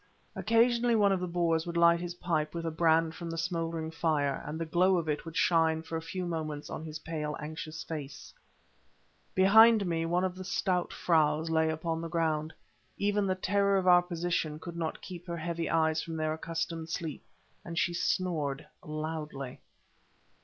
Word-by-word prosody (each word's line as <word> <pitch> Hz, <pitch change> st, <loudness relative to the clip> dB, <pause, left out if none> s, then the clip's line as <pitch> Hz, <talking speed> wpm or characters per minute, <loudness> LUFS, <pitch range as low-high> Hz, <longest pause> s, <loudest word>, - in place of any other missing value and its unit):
Occasionally 235 Hz, +1 st, +3 dB
one 205 Hz, -2 st, +4 dB
of 190 Hz, -, +1 dB
the 180 Hz, -, -3 dB
Boers 170 Hz, -1 st, 0 dB
would 170 Hz, 0 st, -3 dB
light 170 Hz, 0 st, +5 dB
his 175 Hz, 0 st, -5 dB
pipe 165 Hz, -3 st, -1 dB
with 165 Hz, 0 st, -3 dB
a 165 Hz, -, -1 dB
brand 160 Hz, 0 st, +3 dB
from 170 Hz, 0 st, -7 dB
the 165 Hz, -, -4 dB
smouldering 165 Hz, -2 st, -2 dB
fire, 155 Hz, -4 st, 0 dB
and 155 Hz, +2 st, -4 dB
the 165 Hz, -, -2 dB
glow 180 Hz, +3 st, +3 dB
of 165 Hz, -2 st, -2 dB
it 150 Hz, +1 st, -2 dB
would 165 Hz, -1 st, -6 dB
shine 160 Hz, -2 st, +3 dB
for 165 Hz, -, -6 dB
a 160 Hz, -, -2 dB
few 180 Hz, +2 st, -4 dB
moments 155 Hz, -3 st, -4 dB
on -, -, -5 dB
his 155 Hz, -1 st, -6 dB
pale, 155 Hz, -2 st, -4 dB
anxious 155 Hz, +1 st, -6 dB
face. 150 Hz, -4 st, -7 dB, 1.0 s
Behind 220 Hz, +3 st, +7 dB
me 165 Hz, -2 st, -1 dB
one 175 Hz, +2 st, +1 dB
of 185 Hz, -1 st, 0 dB
the 185 Hz, +1 st, -8 dB
stout 185 Hz, -1 st, 0 dB
"fraus" 160 Hz, -1 st, +2 dB
lay 160 Hz, 0 st, +3 dB
upon 160 Hz, +1 st, -2 dB
the 165 Hz, -, -5 dB
ground. 155 Hz, -1 st, 0 dB, 0.5 s
Even 205 Hz, 0 st, +1 dB
the 185 Hz, -, +1 dB
terror 200 Hz, +1 st, +2 dB
of 190 Hz, -, 0 dB
our 180 Hz, -1 st, +7 dB
position 170 Hz, -3 st, -2 dB
could 170 Hz, +2 st, -8 dB
not 165 Hz, -2 st, -4 dB
keep 180 Hz, 0 st, -9 dB
her 170 Hz, 0 st, -3 dB
heavy 170 Hz, 0 st, -3 dB
eyes 160 Hz, -1 st, +2 dB
from 165 Hz, -, -6 dB
their 155 Hz, -1 st, -1 dB
accustomed 165 Hz, 0 st, -4 dB
sleep, 160 Hz, -2 st, -4 dB, 0.4 s
and 170 Hz, -1 st, -7 dB
she 175 Hz, -, +1 dB
snored 160 Hz, -6 st, -1 dB, 0.2 s
loudly. 150 Hz, -3 st, -5 dB
165 Hz, 185 wpm, -30 LUFS, 160-175 Hz, 1.0 s, Behind